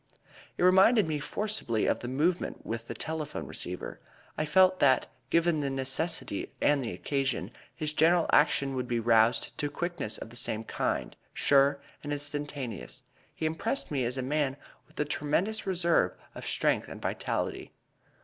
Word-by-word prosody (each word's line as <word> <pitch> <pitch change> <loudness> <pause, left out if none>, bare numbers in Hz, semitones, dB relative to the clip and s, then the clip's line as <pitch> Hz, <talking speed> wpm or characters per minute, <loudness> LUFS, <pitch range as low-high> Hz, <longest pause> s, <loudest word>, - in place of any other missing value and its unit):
It - - 0
reminded 190 +3 +6
me 155 -2 -1
forcibly 200 - -1
of - - +1
the 120 - -6
movement 155 +8 -1
with 115 0 -4
the - - -5
telephone 160 -2 -4
receiver. - - -5 0.4
I 155 - -1
felt 185 +4 +4
that, 130 -2 +4 0.2
given 170 0 +2
the 140 -1 -1
necessity 135 - -1
and 145 -1 +3
the 120 - -3
occasion, 135 +8 -2 0.2
his 155 -1 -2
general 165 +2 +4
action 140 -2 +3
would 125 -1 -2
be 120 -1 0
roused 115 0 +3
to 145 - 0
quickness 175 -10 -2
of 115 - -9
the - - -11
same 110 -2 0
kind - - -2 0.2
sure 140 0 +4 0.2
and 145 - -5
instantaneous. 145 -5 -4 0.3
He - - -3
impressed 180 - -2
me 135 -3 0
as 125 +2 -1
a 130 - -2
man 140 0 0 0.3
with - - -16
a 150 - +2
tremendous 175 +10 -1
reserve 170 - +2 0.2
of - - -7
strength - - +1
and - - -8
vitality. - - -3
145 Hz, 160 wpm, -29 LUFS, 130-165 Hz, 0.4 s, reminded